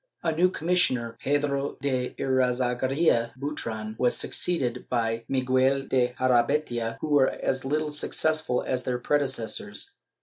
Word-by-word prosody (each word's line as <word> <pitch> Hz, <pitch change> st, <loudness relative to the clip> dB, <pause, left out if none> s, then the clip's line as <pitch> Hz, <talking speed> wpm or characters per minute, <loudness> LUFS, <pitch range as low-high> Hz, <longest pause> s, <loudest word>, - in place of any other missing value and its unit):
A 165 Hz, -, +2 dB
new 175 Hz, +4 st, +3 dB
commissioner, 155 Hz, -10 st, 0 dB
Pedro 140 Hz, 0 st, 0 dB
de 130 Hz, -3 st, -1 dB
Irazagarria 125 Hz, 0 st, +1 dB
Butron, 110 Hz, -7 st, -4 dB
was 125 Hz, -1 st, +2 dB
succeeded 125 Hz, -9 st, 0 dB
by 115 Hz, -2 st, -1 dB
Miguel 130 Hz, +1 st, +2 dB
de 125 Hz, -2 st, 0 dB
Jarabeytia, 120 Hz, -2 st, +1 dB
who 155 Hz, -, -3 dB
were 140 Hz, -2 st, +5 dB
as 130 Hz, 0 st, -2 dB
little 150 Hz, +2 st, -1 dB
successful 155 Hz, -2 st, 0 dB
as 130 Hz, -1 st, -1 dB
their 125 Hz, -1 st, -2 dB
predecessors. 125 Hz, -6 st, -2 dB
130 Hz, 125 wpm, -26 LUFS, 120-145 Hz, -, were